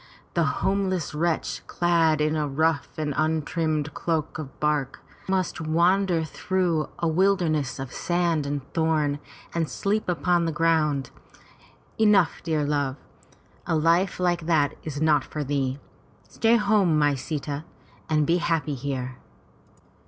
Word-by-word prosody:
The - - +2 0.2
home 195 0 +1
less 180 -5 -2
wretch, 165 +1 -1
clad 165 -3 +2
in 155 +1 +1
a 150 -1 0
rough 155 +1 +1
and 150 -2 -1
untrimmed 155 -1 0
coat 160 -3 -1
of 140 -3 -8
bark, 150 -3 0 0.3
must 185 -3 0
wander 170 +2 +2
through 170 -1 -1
a 170 - 0
wilderness 160 -5 +1
of 135 -2 -6
sand 170 -4 0
and 140 -1 -2
thorn 155 -3 +1 0.3
and 165 -2 -1
sleep 205 0 -1
upon 175 +1 +1
the 165 - 0
ground. 155 -3 +1 0.9
Enough, 210 -5 +4
dear 155 -2 0
love. 145 -2 0 0.7
A 165 - +1
life 170 +5 +2
like 175 -2 0
that 150 -4 +2
is 145 -2 -5
not 150 -3 +3
for 150 +2 -5
thee. 135 -1 -1 0.5
Stay 225 - +2
home, 205 -7 +3
my 145 -1 +3
Sita, 145 +1 -4 0.5
and 155 -1 +2
be 170 +4 +3
happy 165 -3 0
here." 130 -1 -4
160 Hz, 135 wpm, -25 LUFS, 145-175 Hz, 0.9 s, Enough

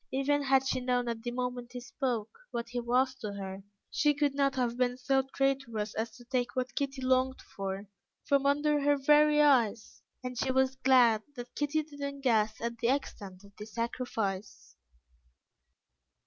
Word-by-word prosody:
Even 280 +2 +1
had 270 -1 +3
she 265 - 0
known 250 -1 0
at 230 -1 -3
the 240 - -3
moment 245 0 -4
he 250 - -5
spoke, 245 -3 -3 0.2
what 235 0 -4
he 245 0 -3
was 250 +2 +2
to 210 -4 -5
her, 195 -1 -6 0.3
she 295 -1 +2
could 290 -1 +1
not 275 -1 +1
have 245 -2 0
been 250 0 0
so 270 +1 +2
traitorous 270 -6 0
as 225 +1 -2
to 240 - -15
take 245 0 -1
what 255 -1 -2
Kitty 275 -2 -3
longed 260 0 +2 0.2
for, 195 +1 -4 0.4
from 280 0 +2
under 295 +1 +2
her 290 0 +3
very 300 +2 +5
eyes; 240 -7 +2 0.2
and 250 -1 -5
she 260 - +1
was 265 0 +2
glad 245 -5 +5
that 245 -1 -8
Kitty 295 +1 0
did 290 -1 -14
not 280 0 -4
guess 220 -4 +2
at 235 0 -3
the 230 - +1
extent 205 -8 -3
of 200 0 -17
the 210 - -8
sacrifice. 220 - -4
250 Hz, 175 wpm, -30 LUFS, 230-275 Hz, 0.4 s, very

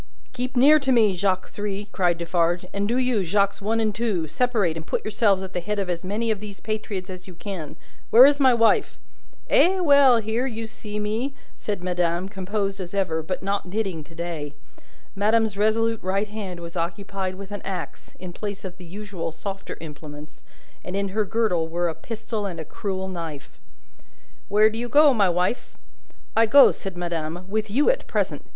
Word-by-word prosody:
"Keep 255 +1 -4
near 290 +5 +7
to 270 -2 0
me, 220 -5 +5
Jacques 185 0 0
Three," 205 0 -4
cried 175 -3 +1
Defarge; 170 +1 0
"and 200 0 -1
do 240 +3 0
you, 250 -5 +1
Jacques 200 +3 +1
One 220 +3 0
and 215 -2 +1
Two, 205 -7 -1
separate 210 -3 +1
and 165 - -5
put - - -2
yourselves 205 -3 +2
at 190 0 -8
the - - -1
head 210 +4 -3
of 195 -3 -1
as 170 0 -4
many 215 +4 -1
of 215 - -1
these 205 -1 -9
patriots 210 -3 -4
as 185 -1 -9
you 185 - -11
can. 170 -5 -6 0.3
Where 245 +3 +9
is 285 +1 +4
my 265 -2 +6
wife?" 230 -2 +3 0.5
"Eh, 375 +2 +4
well! 280 -7 +6
Here 225 +3 -1
you 225 -2 -4
see 210 -1 -7
me!" 220 +6 -2 0.2
said 205 -4 -4
madame, 175 0 0
composed 195 0 -3
as 180 +1 -7
ever, 170 -5 0
but 185 +4 -4
not 200 -1 -1
knitting 190 -5 -2
to 165 - -16
day. 165 -4 -5 0.6
Madame's 215 +1 +2
resolute 225 +2 +1
right 195 +3 -1
hand 195 -5 -6
was 170 +1 -8
occupied 185 +2 -3
with 195 +1 -9
an 205 - -5
axe, 190 -2 -6
in 180 -1 -8
place 200 0 -6
of 185 0 -7
the 180 - -11
usual 195 -2 -5
softer 195 +4 -6
implements, 150 -1 -10 0.4
and 180 - -5
in 200 0 -1
her 210 +2 0
girdle 205 -7 +1
were 175 +1 -1
a - - -3
pistol 215 +4 -5
and 175 -3 -6
a 160 - -5
cruel 190 +1 -4
knife. 165 -6 -7 0.9
"Where 215 +2 +5
do 225 - -4
you 240 0 -3
go, 290 0 +6
my 205 -5 +3
wife?" 180 +7 -1 0.6
"I 225 0 +5
go," 275 +5 +8
said 190 -3 -6
madame, 170 0 -3
"with 215 +2 -2
you 280 - +4
at - - -5
present. - - -1
200 Hz, 195 wpm, -24 LUFS, 180-220 Hz, 0.9 s, Where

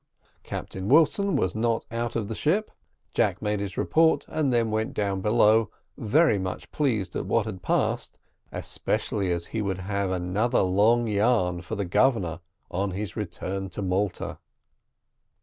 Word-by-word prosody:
Captain 95 +2 -5
Wilson 165 +5 +4
was 95 -9 +1
not 115 +1 0
out 115 +1 -3
of 110 -3 -1
the 110 - -4
ship. 185 - 0 0.4
Jack - - +1
made 105 -1 -1
his 100 -2 -5
report, 160 0 +3
and 155 -4 0
then 115 -2 +2
went 110 +1 -1
down 100 -2 -1
below, 110 0 +4 0.3
very 125 -1 +3
much 95 0 -5
pleased 110 -11 -1
at - - -3
what 115 -3 +2
had 100 -5 -6
passed, - - 0 0.3
especially 95 -4 -1
as 85 -1 -1
he 110 - 0
would 95 -3 -1
have 100 0 -1
another 95 +6 +1
long 105 +6 +3
yarn 100 -5 +1
for 100 +5 -5
the 100 -1 -2
Governor 90 -4 +2 0.3
on 100 +3 -1
his 100 -1 -4
return 95 -1 -4
to 100 +2 -5
Malta. 95 +1 -2
105 Hz, 155 wpm, -26 LUFS, 95-115 Hz, 0.4 s, Wilson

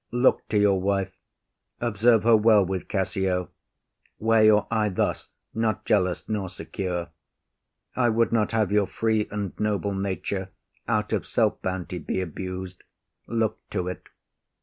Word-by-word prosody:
Look 120 +2 +2
to 105 - +1
your 100 -2 +3
wife; 95 -1 -1 0.6
observe 115 0 +3
her 115 0 +6
well 105 -2 +5
with 95 0 -4
Cassio; 95 -2 -1 0.7
Wear 110 0 +3
your 105 -1 +5
eye 110 -2 +2
thus, 95 - -1 0.2
not 110 -2 -1
jealous 90 -4 +1
nor 100 -4 -2
secure. 90 -2 -4 0.9
I 120 -2 +3
would 115 +1 +2
not 110 -3 +1
have 110 -4 +1
your 105 -2 +3
free 110 -1 0
and 100 -3 -4
noble 105 -1 0
nature, 95 0 -3 0.4
Out - - 0
of - - -1
self - - +1
bounty, 90 -1 -3
be 80 - -3
abus’d. 95 +1 -5 0.5
Look 110 -1 -1
to’t. 90 -2 -4
100 Hz, 140 wpm, -25 LUFS, 95-110 Hz, 0.9 s, her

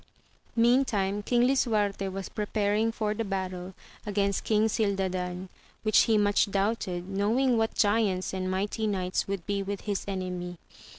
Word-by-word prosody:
Meantime 230 -5 +2
Eong 240 0 +5
lisuarte 210 -7 +1
was 195 0 -5
preparing 210 +1 0
for 215 -2 -1
the 225 +2 -2
battle 185 -2 -4 0.3
against 200 -2 0
King 215 0 +3
Gildadan, 190 -4 -1 0.4
which 215 -1 +5
he 220 -2 +3
much 205 0 +3
doubted, 195 -3 -1
knowing 220 +7 +2
what 225 -1 0
giants 205 -4 +1
and 185 -1 -2
mighty 205 +4 -1
knights 185 -3 -1
would 195 -3 -3
be 200 -1 -1
with 200 0 -4
his 205 -2 -2
enemy. 180 -2 -4
200 Hz, 140 wpm, -28 LUFS, 190-220 Hz, 0.4 s, Eong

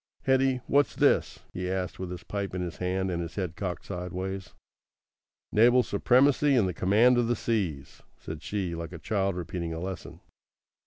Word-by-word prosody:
"Hetty, 130 -1 +2
what's 145 +1 +2
this?" - - +2
he 90 0 -3
asked, 95 -1 -3
with 95 -1 -4
his 90 -1 -7
pipe 100 -2 -4
in 90 - -2
his 85 -2 -5
hand 95 +1 -1
and 85 -1 -2
his 85 -1 -6
head 90 -5 -3
cocked 90 -4 -4
sideways. 95 +1 -5 1.0
"Naval 120 +3 +5
supremacy 135 +7 +3
and 110 -6 +3
the 90 - -2
command 110 +8 +4
of 120 - +1
the 120 - +1
seas," 90 - -2 0.2
said 80 -1 -8
she, 95 -1 -3
like 85 0 -6
a - - -6
child 95 +3 -1
repeating 85 -1 -4
a - - -4
lesson. 95 +1 -6
95 Hz, 175 wpm, -28 LUFS, 90-115 Hz, 1.0 s, Naval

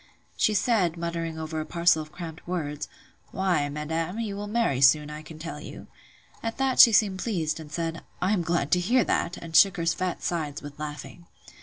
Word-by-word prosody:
She 215 - +2
said, 185 -5 +2
muttering 165 -1 -3
over 160 0 -4
a - - -5
parcel 170 -2 +3
of 155 0 -10
cramp 165 -1 -8
words; 150 -4 -3 0.4
Why, 175 -7 0
madam, 160 +6 -3
you 215 -3 -3
will 205 +1 -5
marry 210 - 0
soon, 150 +2 +5
I 150 0 -7
can 155 0 -11
tell 155 -2 -7
you. - - -9 0.6
At 225 0 -4
that 265 -1 0
she 235 - +10
seemed 200 -3 +3
pleased, 165 -9 -1
and 155 -2 -10
said, 165 0 -3 0.2
I 185 - +1
am 195 - +1
glad 165 -4 -1
to 180 - +4
hear 235 +7 +3
that; 175 - -1
and 165 -1 -8
shook 195 -1 +6
her 165 - -2
fat 180 +1 -1
sides 155 -4 -2
with 145 0 -10
laughing. 150 +3 -7
170 Hz, 200 wpm, -26 LUFS, 155-190 Hz, 0.6 s, she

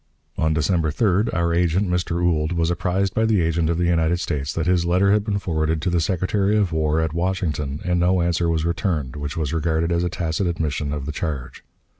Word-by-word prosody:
On 80 0 +1
December 80 +1 +1
3d 100 +5 +1
our 85 -1 0
agent, 90 +3 +1
Mr. 90 -1 -1
Ould, 80 -1 +1
was 85 0 +1
apprised 95 +2 0
by 110 - +1
the 110 -3 +3
agent 80 -1 +1
of 85 - 0
the 90 - +1
United 85 0 +2
States 70 -5 -2
that 80 - -2
his 90 -1 +2
letter 90 +3 +3
had 105 0 +3
been 105 -2 -1
forwarded 80 -4 -1
to 90 - 0
the 85 -1 +2
Secretary 95 +4 +1
of 100 -5 +1
War 80 0 +1
at 80 -1 -1
Washington, 80 -5 -2
and 90 -1 +1
no 90 +1 +3
answer 85 0 +1
was 80 -1 0
returned, 80 -6 -1
which 75 +1 -5
was 75 -2 -2
regarded 80 +1 0
as 85 0 +1
a 90 - 0
tacit 85 +2 -2
admission 75 -4 -2
of 75 -2 -4
the 75 - -3
charge. 75 -5 -5
85 Hz, 220 wpm, -22 LUFS, 80-90 Hz, -, the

